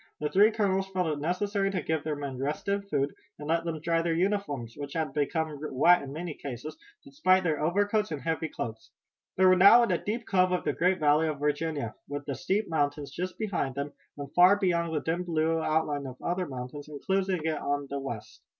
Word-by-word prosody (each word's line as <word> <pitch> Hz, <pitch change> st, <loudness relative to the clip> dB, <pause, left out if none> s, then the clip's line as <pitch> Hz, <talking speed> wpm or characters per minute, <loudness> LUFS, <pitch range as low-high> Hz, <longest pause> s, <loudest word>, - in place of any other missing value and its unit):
The 150 Hz, -, -1 dB
three 205 Hz, +6 st, +6 dB
colonels 195 Hz, -3 st, 0 dB
felt 185 Hz, -1 st, -1 dB
it 150 Hz, -2 st, -1 dB
necessary 195 Hz, +5 st, 0 dB
to 195 Hz, -2 st, -1 dB
give 160 Hz, -2 st, -2 dB
their 155 Hz, -1 st, -2 dB
men 140 Hz, -3 st, -5 dB
rest 145 Hz, +7 st, -3 dB
and 200 Hz, 0 st, 0 dB
food, 140 Hz, -3 st, 0 dB, 0.2 s
and 150 Hz, -, -8 dB
let 165 Hz, +1 st, +1 dB
them 165 Hz, -2 st, -3 dB
dry 165 Hz, +1 st, +1 dB
their 165 Hz, -1 st, 0 dB
uniforms, 170 Hz, -, -1 dB
which 145 Hz, -1 st, -7 dB
had 155 Hz, -4 st, -2 dB
become 155 Hz, 0 st, -1 dB
wet 155 Hz, +4 st, +4 dB
in 140 Hz, -1 st, -7 dB
many 165 Hz, +2 st, -5 dB
cases, 140 Hz, +2 st, -7 dB, 0.3 s
despite 275 Hz, -10 st, +2 dB
their 155 Hz, -4 st, 0 dB
overcoats 205 Hz, +5 st, +1 dB
and 150 Hz, -, -3 dB
heavy 160 Hz, -1 st, -1 dB
cloaks. 110 Hz, -4 st, -6 dB, 0.5 s
They 190 Hz, -, +5 dB
were 185 Hz, 0 st, +7 dB
now 200 Hz, +6 st, +8 dB
in 235 Hz, -, +1 dB
a -, -, 0 dB
deep 230 Hz, +3 st, -3 dB
cove 185 Hz, -1 st, +2 dB
of 180 Hz, -, 0 dB
the 145 Hz, -, 0 dB
great 180 Hz, +4 st, +2 dB
Valley 150 Hz, +1 st, +3 dB
of 155 Hz, -2 st, -2 dB
Virginia, 150 Hz, -5 st, -1 dB, 0.2 s
with 145 Hz, 0 st, -5 dB
the 140 Hz, -, -3 dB
steep 195 Hz, +7 st, -1 dB
mountains 145 Hz, -2 st, -1 dB
just 180 Hz, +1 st, -4 dB
behind 185 Hz, -, -2 dB
them, 140 Hz, +1 st, -4 dB, 0.2 s
and 140 Hz, -1 st, -7 dB
far 180 Hz, +3 st, +7 dB
beyond 170 Hz, -4 st, +1 dB
the 155 Hz, -2 st, -1 dB
dim 170 Hz, +2 st, -1 dB
blue 165 Hz, -1 st, 0 dB
outline 150 Hz, -3 st, 0 dB
of 130 Hz, -1 st, -9 dB
other 180 Hz, 0 st, -2 dB
mountains 130 Hz, +3 st, -7 dB
enclosing 185 Hz, +3 st, -1 dB
it 155 Hz, -2 st, 0 dB
on 145 Hz, 0 st, -1 dB
the 140 Hz, -, -2 dB
west. 120 Hz, -6 st, -7 dB
160 Hz, 215 wpm, -28 LUFS, 145-185 Hz, 0.5 s, now